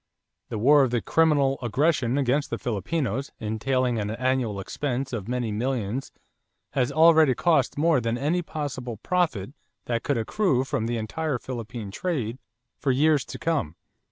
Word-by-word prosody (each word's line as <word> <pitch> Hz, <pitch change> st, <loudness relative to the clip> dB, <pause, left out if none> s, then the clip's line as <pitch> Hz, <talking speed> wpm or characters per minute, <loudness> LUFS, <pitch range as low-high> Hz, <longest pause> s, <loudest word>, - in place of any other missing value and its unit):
The -, -, -3 dB
war 140 Hz, +7 st, +6 dB
of 125 Hz, -2 st, 0 dB
'criminal 145 Hz, -4 st, +3 dB
aggression' 130 Hz, +1 st, +1 dB
against 140 Hz, +1 st, +1 dB
the -, -, -2 dB
Filipinos 125 Hz, -, -2 dB
entailing 120 Hz, +2 st, 0 dB
an 105 Hz, -1 st, -2 dB
annual 120 Hz, -2 st, 0 dB
expense 135 Hz, +5 st, -3 dB
of 105 Hz, -4 st, -4 dB
many 120 Hz, -2 st, -1 dB
millions 120 Hz, +1 st, -2 dB, 0.6 s
has 125 Hz, -3 st, 0 dB
already 160 Hz, -4 st, +6 dB
cost 155 Hz, -8 st, +2 dB
more 155 Hz, -3 st, +3 dB
than 115 Hz, +1 st, -1 dB
any 155 Hz, +7 st, 0 dB
possible 135 Hz, -7 st, -5 dB
profit 140 Hz, -, -1 dB, 0.3 s
that 115 Hz, -1 st, -1 dB
could 140 Hz, 0 st, 0 dB
accrue 130 Hz, -, +1 dB
from 115 Hz, -4 st, -2 dB
the 120 Hz, 0 st, -1 dB
entire 135 Hz, +6 st, -2 dB
Philippine 120 Hz, -4 st, -6 dB
trade 130 Hz, -, -3 dB, 0.4 s
for 140 Hz, -, -1 dB
years 145 Hz, +1 st, +3 dB
to -, -, -7 dB
come.... 150 Hz, -, -1 dB
130 Hz, 150 wpm, -25 LUFS, 115-145 Hz, 0.6 s, war